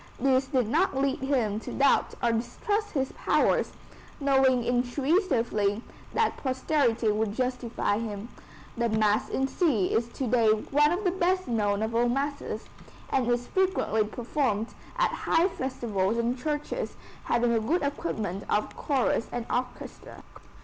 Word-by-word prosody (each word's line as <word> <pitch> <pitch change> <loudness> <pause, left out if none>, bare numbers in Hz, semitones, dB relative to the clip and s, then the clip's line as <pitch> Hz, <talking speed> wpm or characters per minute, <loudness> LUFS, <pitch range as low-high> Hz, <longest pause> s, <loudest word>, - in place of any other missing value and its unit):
This 265 0 +2
did 255 -6 +1
not 305 - +1
lead 275 0 +1
him 250 -6 0
to - - -8
doubt 275 0 +2
or 235 - +3
distrust 410 - -2
his 270 -3 -1
powers, - - +1 0.5
knowing 265 -3 +3
intuitively 245 - +1 0.3
that 450 - +1
posterity 260 -4 +1
would 210 0 -1
justify 250 -4 -1
him. 220 0 -5 0.5
The 235 0 0
Mass 215 -1 +2
in 265 - 0
C 265 - +1
is 230 +1 +1
to 265 - -3
day 230 -2 +3
one 285 +8 +3
of 360 +4 -1
the 365 - +2
best 370 0 0
known 210 -3 0
of 220 +1 -2
all 240 +1 +2
masses, 280 +3 -2 0.5
and 260 -3 +1
is 240 0 +1
frequently 375 - +1
performed 230 0 -1 0.3
at - - +2
high 335 +4 +2
festivals 230 - -2
in 235 +1 0
churches 295 +3 -3 0.3
having 240 0 +2
a 225 - +3
good 295 +11 0
equipment 220 - -3
of 210 - 0
chorus 265 -5 0
and 240 -1 -3
orchestra. 250 0 -5
245 Hz, 145 wpm, -27 LUFS, 225-280 Hz, 0.5 s, or